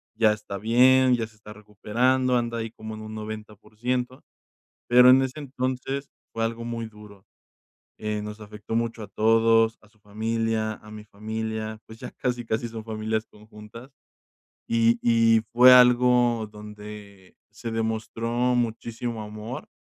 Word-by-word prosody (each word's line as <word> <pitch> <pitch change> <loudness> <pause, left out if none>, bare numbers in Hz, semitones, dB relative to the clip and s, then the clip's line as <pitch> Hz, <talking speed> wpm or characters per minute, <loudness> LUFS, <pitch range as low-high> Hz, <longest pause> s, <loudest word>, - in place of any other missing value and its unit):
ya 110 -1 +4
está 105 -2 -7
bien, 125 +4 +5
ya 115 -2 -2
se 110 - -23
está 105 0 -13
recuperando, 120 +5 0
anda 115 -1 -2
ahí 115 0 -4
como 110 -1 -9
en 110 - -9
un 110 0 -8
90%, 110 +4 -5 0.6
pero 125 +1 +7
en 130 +1 +7
ese 130 +3 -4
entonces 135 0 -4 0.2
fue 115 - -2
algo 115 +1 -3
muy 115 -1 -4
duro. 105 -2 -15 0.7
Eh, 105 -1 -3
nos 105 +1 -7
afectó 105 +1 -7
mucho 115 0 -1
a - - -8
todos, 115 +2 +3
a 105 - -21
su 105 0 -31
familia, 110 +1 -2
a 105 0 -14
mi 105 0 -9
familia, 110 +1 -5
pues, 110 0 -13
ya - - -8
casi, 120 -2 -3
casi 115 +1 -2
son 115 -1 -8
familias 110 0 -2
conjuntas. 105 +3 -14 0.8
Y 115 +1 +3
y 115 -1 +4
fue 125 +2 +8
algo 125 -2 +5
donde 105 -2 -12 0.2
se 115 +1 -6
demostró 110 0 -3 0.3
muchísimo 115 0 -3
amor, 110 +6 -8
110 Hz, 150 wpm, -25 LUFS, 105-120 Hz, 0.8 s, fue